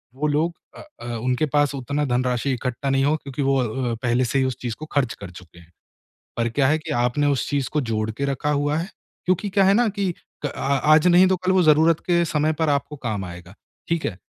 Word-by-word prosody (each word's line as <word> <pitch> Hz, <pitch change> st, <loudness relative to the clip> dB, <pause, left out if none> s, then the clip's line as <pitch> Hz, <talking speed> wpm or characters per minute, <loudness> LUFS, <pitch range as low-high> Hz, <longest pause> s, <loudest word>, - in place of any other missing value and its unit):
वो 150 Hz, +3 st, -1 dB
लोग 155 Hz, +4 st, +1 dB, 0.2 s
अ -, -, -9 dB, 0.2 s
अ, -, -, -8 dB
उनके 125 Hz, +5 st, 0 dB
पास 145 Hz, -1 st, +2 dB
उतना 140 Hz, +3 st, -2 dB
धनराशि 125 Hz, +1 st, 0 dB
इकट्ठा 125 Hz, +2 st, -3 dB
नहीं 135 Hz, 0 st, +2 dB
हो 150 Hz, +2 st, +3 dB
क्योंकि 140 Hz, -1 st, -6 dB
वो 135 Hz, 0 st, +2 dB
अ, 120 Hz, 0 st, -1 dB
पहले 125 Hz, +1 st, +2 dB
से 135 Hz, +3 st, 0 dB
ही 130 Hz, -, +2 dB
उस 130 Hz, -2 st, -2 dB
चीज़ 120 Hz, -3 st, -3 dB
को 155 Hz, -, -6 dB
ख़र्च 130 Hz, -5 st, +1 dB
कर 100 Hz, -, -10 dB
चुके 85 Hz, -1 st, -14 dB
हैं। 85 Hz, 0 st, -19 dB, 0.7 s
पर 115 Hz, 0 st, 0 dB
क्या 130 Hz, +3 st, +1 dB
है 155 Hz, +2 st, +2 dB
कि 160 Hz, 0 st, -8 dB
आपने 135 Hz, +4 st, +1 dB
उस 140 Hz, -2 st, 0 dB
चीज़ 140 Hz, -3 st, 0 dB
को 150 Hz, -, +1 dB
जोड़ 110 Hz, 0 st, -1 dB
के 125 Hz, +6 st, -4 dB
रखा 140 Hz, +1 st, -1 dB
हुआ 145 Hz, +1 st, 0 dB
है, 170 Hz, +3 st, -3 dB, 0.4 s
क्योंकि 185 Hz, +3 st, 0 dB
क्या 195 Hz, 0 st, +3 dB
है 195 Hz, +1 st, +5 dB
ना 235 Hz, +2 st, +3 dB
कि 200 Hz, -2 st, -1 dB, 0.4 s
क -, -, -3 dB
आज 150 Hz, +4 st, +3 dB
नहीं 180 Hz, +1 st, +6 dB
तो 190 Hz, -, +2 dB
कल 185 Hz, +1 st, 0 dB
वो 185 Hz, -1 st, +4 dB
ज़रूरत 155 Hz, +1 st, +4 dB
के 170 Hz, -1 st, +3 dB
समय 155 Hz, -1 st, +1 dB
पर 160 Hz, +1 st, 0 dB
आपको 145 Hz, +1 st, -1 dB
काम 110 Hz, -5 st, -2 dB
आएगा, 90 Hz, +1 st, -10 dB, 0.3 s
ठीक 170 Hz, -1 st, -1 dB
है? 95 Hz, -, -2 dB
140 Hz, 240 wpm, -23 LUFS, 125-155 Hz, 0.7 s, नहीं